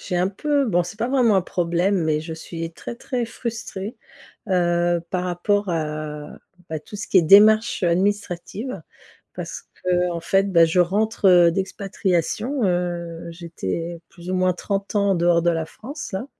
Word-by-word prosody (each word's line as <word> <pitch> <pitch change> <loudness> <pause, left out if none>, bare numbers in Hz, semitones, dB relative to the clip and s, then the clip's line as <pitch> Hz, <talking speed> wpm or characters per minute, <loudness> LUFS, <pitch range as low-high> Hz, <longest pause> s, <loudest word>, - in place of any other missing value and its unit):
j'ai 180 - -3
un 180 +2 +2
peu, 285 +7 0
bon, 175 -6 +1
c'est 210 - -8
pas 230 +3 -1
vraiment 250 -5 +3
un 190 - +4
problème, 175 +1 0
mais 155 -1 +1
je 160 +1 -7
suis 165 0 -6
très, 200 - -7
très 245 0 -3
frustrée, 230 -3 -6 0.5
heu, 175 -2 +2
par 180 -1 -1
rapport 190 +3 0
à, 150 -2 -4 0.3
bah, 160 - -3
tout 155 - -14
ce 210 - -5
qui 190 - +5
est - - +5
démarche, 215 +7 +6
heu, 175 - +3
administrative 200 +5 -2 0.5
parce - - -6 0.2
qu'en 180 -1 +1
fait, 195 +3 +1
bah, 170 -2 +7
je 165 +3 0
rentre, 210 +4 +1
heu, 175 -2 +7
d'expatriation, 195 - -1
heu, 175 -2 -2
j'étais 170 - -5
plus 175 0 -9
ou - - 0
moins 185 0 +2
30 195 +3 -3
ans 200 -1 +3
en - - +3
dehors 170 0 +3
de 175 - +3
la 165 -1 -1
France 280 - -8
là 190 +6 -3
180 Hz, 175 wpm, -22 LUFS, 170-205 Hz, 0.5 s, bah